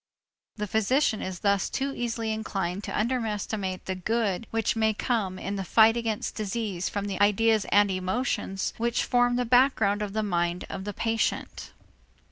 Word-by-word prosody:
The 210 -2 -3
physician 220 +4 +1
is 185 -2 -5
thus 200 -1 +2
too 275 +1 -2
easily 230 -2 -2
inclined 195 -3 -3
to - - -3
underestimate 215 -5 -2
the 190 - -2
good 215 +2 -1
which 225 0 0
may 220 -1 +2
come 205 -6 -1
in 200 +1 -4
the 195 - -2
fight 220 +4 +5
against 225 -3 -2
disease 205 -3 -3
from 200 -1 -3
the 195 -1 -3
ideas 215 +1 +3
and 205 -1 +4
emotions 190 +1 -2
which 235 +1 0
form 245 -1 +2
the 250 0 0
background 230 -5 +3
of 205 -2 -3
the 215 0 0
mind 175 -2 -1
of 190 0 -5
the 205 - -4
patient. 225 +2 -2
215 Hz, 165 wpm, -27 LUFS, 195-230 Hz, -, fight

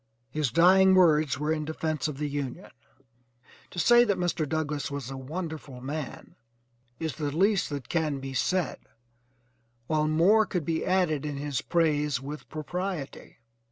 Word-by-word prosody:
His 150 -1 0
dying 190 +5 +6
words 155 -6 +4
were 150 +2 0
in 155 -1 -2
defence 155 -2 -2
of 150 -3 -5
the 150 +1 -2
Union. 140 -3 -5 1.0
To - - -13
say 240 +7 +6
that 205 -5 +1
Mr. 175 -4 -1
Douglass 155 -2 -2
was 140 -3 -5
a - - -5
wonderful 150 -1 -6
man 140 +2 -6 0.7
is 160 -3 -3
the 150 -2 -1
least 195 +6 +2
that 145 -3 -5
can 155 -4 0
be 135 0 -6
said, 180 +6 0 1.1
while 155 +2 +1
more 190 +8 +4
could 180 -6 -2
be 160 0 -1
added 180 -6 +1
in 145 -2 -4
his 145 -1 -2
praise 150 -6 +1
with 145 +3 -8
propriety. 175 0 -5
155 Hz, 155 wpm, -28 LUFS, 145-175 Hz, 1.1 s, dying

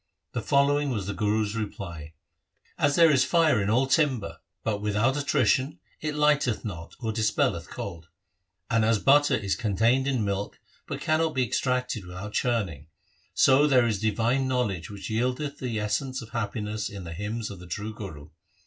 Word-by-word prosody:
The - - -3
following 145 +1 +2
was 105 -7 -2
the 100 - -3
Guru's 105 +2 0
reply: 85 -8 -6 0.3
' - - -58 0.3
As 145 -1 +3
there 165 -2 +6
is 135 -3 +4
fire 160 - +3
in 100 - -1
all 125 +5 +3
timber, 130 - +1 0.2
but 105 -2 -1
without 105 +5 +1
attrition 140 +1 +1 0.2
it 155 -1 -3
lighteth 150 -7 +2
not 85 -6 -7
or 110 -2 -1
dis 110 -1 +1
pelleth - - 0
cold; 85 -1 -7 0.6
and 115 -1 +2
as 115 0 +3
butter 145 +6 +4
is 100 -3 -1
contained 115 +4 +1
in 130 -6 0
milk 100 0 -3 0.3
but - - -5
cannot 155 0 +1
be 130 -1 +2
extracted 125 -2 -1
without 90 +4 -7
churning; 95 - -1 0.5
so 135 +3 +5
there 130 -4 +4
is 110 -4 0
divine 115 +5 +1
knowledge 110 -10 -1
which 100 0 -7
yieldeth 125 +6 -1
the 120 -4 -2
essence 130 +5 -1
of 115 - -12
happiness 105 -1 -3
in 100 -2 -8
the 85 -1 -7
hymns 105 +5 -4
of 100 - -9
the 90 - -11
true 105 +6 -4
Guru. 80 -9 -9
110 Hz, 175 wpm, -27 LUFS, 100-130 Hz, 0.6 s, there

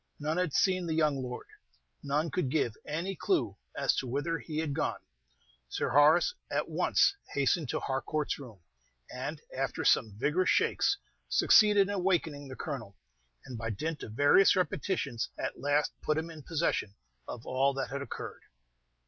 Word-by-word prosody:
None 155 +3 -1
had 180 -3 +1
seen 185 +2 +2
the 160 - -1
young 150 -4 +2
lord, 125 -1 -6 0.6
none 150 +3 -1
could 145 -3 -1
give 130 -6 0
any 170 +6 -2
clew 370 - 0 0.2
as - - +2
to 130 - -1
whither 145 +6 -1
he 155 -2 -6
had 155 -3 -1
gone. 150 - -1 0.7
Sir - - -1
Horace 155 - +5 0.2
at - - -1
once - - +3 0.2
hastened 140 +1 +1
to - - -1
Harcourt's 145 +3 -2
room, 115 -9 -11 0.5
and, - - -4 0.2
after - - -2
some 105 -3 +3
vigorous 160 +10 +1
shakes, 400 - +2 0.3
succeeded 210 -2 +6
in 205 - -2
awakening 170 -7 0
the 130 - -8
Colonel, 115 -11 -6 0.5
and 125 -3 -7
by 110 0 -3
dint 150 +10 -3
of 105 - -7
various 145 - +5
repetitions 150 - -1
at - - -4
last 145 +1 +2
put 155 - 0
him 160 +1 -3
in 155 -2 -10
possession 145 -10 -1 0.3
of 120 - -7
all 135 +2 +2
that 135 -1 -3
had 140 +1 -3
occurred. 140 - -7
150 Hz, 165 wpm, -30 LUFS, 135-165 Hz, 0.7 s, succeeded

